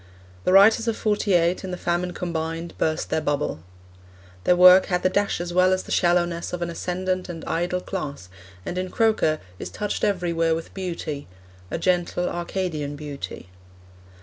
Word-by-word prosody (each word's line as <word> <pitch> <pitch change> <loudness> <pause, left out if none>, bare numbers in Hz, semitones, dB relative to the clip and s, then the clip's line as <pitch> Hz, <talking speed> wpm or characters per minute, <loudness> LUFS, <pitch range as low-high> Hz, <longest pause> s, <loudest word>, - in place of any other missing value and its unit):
The - - +3
writers 220 +4 +6
of 225 - 0
'Forty 210 -2 +1
eight, 175 +2 +2
and 190 - -5
the 180 - -4
famine 175 +1 -1
combined, 165 -1 -4
burst 155 0 -1
their 160 - +1
bubble. 145 - -1 0.9
Their 180 - +5
work 180 +1 +8
had 180 -2 0
the 185 - +4
dash 200 -1 +1
as 175 0 -4
well 185 +1 +4
as 185 - -1
the - - -10
shallowness 175 -1 +1
of 175 -1 -2
an 170 - -3
ascendant 185 +2 -2
and 165 -2 -7
idle 175 +2 -1
class, 145 - -5 0.4
and 180 - -3
in 185 0 -3
Croker 215 -9 +2 0.2
is - - -5
touched 210 -1 -3
everywhere 170 -5 +1
with 165 - -7
beauty 170 -6 -5 0.4
a - - -2
gentle 180 0 0
Arcadian 170 -4 -3
beauty. 140 - -7
175 Hz, 170 wpm, -24 LUFS, 165-185 Hz, 0.9 s, work